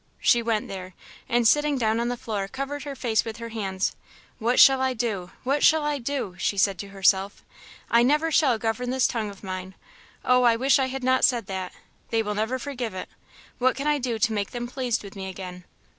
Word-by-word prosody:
She 240 - +4
went 225 -2 -1
there, 185 -2 -8 0.3
and 240 -1 +3
sitting 295 +2 +3
down 225 -2 +1
on 235 - 0
the 245 0 -2
floor, 205 -4 -3
covered 275 +6 -5
her 280 -1 -5
face 235 -4 +1
with 225 -1 -6
her 230 0 -7
hands. 195 -4 -2 0.4
"What 240 +2 +1
shall 270 -1 +7
I 260 -1 +1
do? 215 -6 -2
what 275 +3 0
shall 315 -1 +5
I 295 -1 -1
do?" 250 -7 -3
she 200 +4 0
said 195 -1 +2
to 200 - -5
herself, 195 0 +1 0.5
"I 235 - +6
never 300 +6 +2
shall 275 -7 +3
govern 225 +3 -2
this 260 0 +2
tongue 220 -3 -1
of 200 0 -12
mine. 185 0 -6 0.5
Oh, 250 0 +4
I 240 -2 +5
wish 270 +4 +3
I 265 - +1
had 265 0 -5
not 260 0 +2
said 240 -4 +3
that! 190 -1 -5 0.4
they 225 -1 +1
will 210 0 -2
never 220 +5 -1
forgive 250 -5 -5
it. 185 - -6 0.5
What 255 +1 +3
can 275 - -4
I 300 -1 +2
do 245 -3 -2
to 220 +1 +1
make 205 -2 -2
them 240 0 -5
pleased 250 -3 -2
with 200 0 -10
me 190 -1 -5
again? 180 -1 -8
235 Hz, 220 wpm, -25 LUFS, 200-260 Hz, 0.5 s, shall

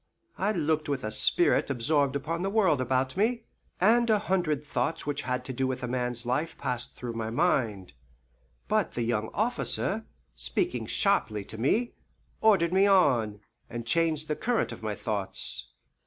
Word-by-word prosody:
I 200 +3 +2
looked 155 -5 0
with 140 -2 -2
a 110 - -3
spirit 345 - +3
absorbed 140 +2 +1
upon 165 +4 -2
the 195 - 0
world 190 -10 +3
about 130 +1 0
me, 230 +4 +1 0.4
and 235 +5 +4
a 215 - +5
hundred 175 -7 -1
thoughts 135 +3 -2
which 145 -1 -2
had 125 0 -3
to 130 - -5
do 130 +1 0
with 130 -1 -3
man's 125 -1 -2
life 145 +7 -1
passed 125 -1 -3
through 120 -2 -5
my 115 -1 -3
mind. 115 - 0 0.7
But - - +1
the 120 - -2
young 110 -2 -1
officer, 220 -1 0 0.3
speaking - - -1
sharply 105 -2 +1
to 110 - -9
me, 230 - +1 0.5
ordered 185 -6 +4
me 195 +2 +5
on, 120 - +3 0.3
and 120 0 -6
changed 155 +3 +1
the 150 - -1
current 240 +6 0
of - - -9
my 105 -1 -3
thoughts. 95 - -1
140 Hz, 165 wpm, -28 LUFS, 120-185 Hz, 0.7 s, a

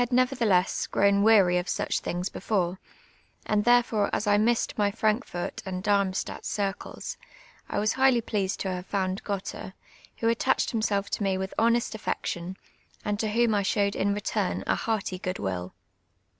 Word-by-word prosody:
nevertheless, 245 -7 +2
f^rown 200 0 +3
weary 200 -5 +5
of 180 - -5
such - - 0
thinp;s 175 +1 -2
before, 185 -3 -1 0.7
and 210 0 +1
tiun 245 0 +6
fore 210 -4 0
us 210 - -1
I 205 -1 +4
missed 235 +2 +1
my 205 -1 +2
Frankf«)rt 210 -3 -1
and 185 -1 -5
Darmstadt 200 -2 0
circles, 200 -1 -4 0.5
I - - -2
was 215 +1 +2
hi;;ldy 260 -3 +3
j)leased 200 -4 -1
to 190 - -1
have 180 0 -5
found 190 -1 -1
Gottrr, 195 -1 -5 0.5
Avho 230 0 +2
attachfd 265 +3 +1
himself 205 -3 0
to - - -2
me 195 -1 +1
witli 190 0 -4
honest 235 +1 +2
affection, 185 -4 -4 0.5
and 205 0 -1
td 220 - 0
whom 235 -1 +3
I 205 - +2
showed 200 +1 +1
in 200 - +1
return 205 -1 -1
a - - +2
hearty 205 -4 -2
^ood 185 0 -3
will. 90 -2 -4
205 Hz, 165 wpm, -27 LUFS, 190-220 Hz, 0.7 s, tiun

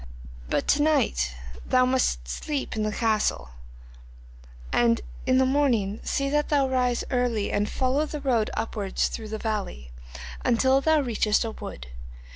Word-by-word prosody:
But - - 0
to 290 - +4
night 65 - +1 0.3
thou 255 0 +3
must 250 - 0
sleep 280 - -3
in 220 - -1
the 215 - 0
this 210 - -5
castle, 215 - 0 1.2
and 115 -1 +3 0.3
in 255 - +4
the 260 - +4
morning 245 -7 +1
see 275 -1 -1
that 295 0 +1
thou 280 -3 +3
rise 250 -2 +1
early 245 -5 0
and 205 +1 0
follow 270 +4 0
the 300 - -5
road 245 -6 +1
upwards 210 -3 -1
through 220 -2 -6
the 220 - -3
valley, 200 - -4 0.5
until 260 +3 +3
thou 315 0 +3
reachest 225 -3 +1
a 225 - -3
wood. 60 - -8
235 Hz, 155 wpm, -26 LUFS, 210-270 Hz, 1.2 s, to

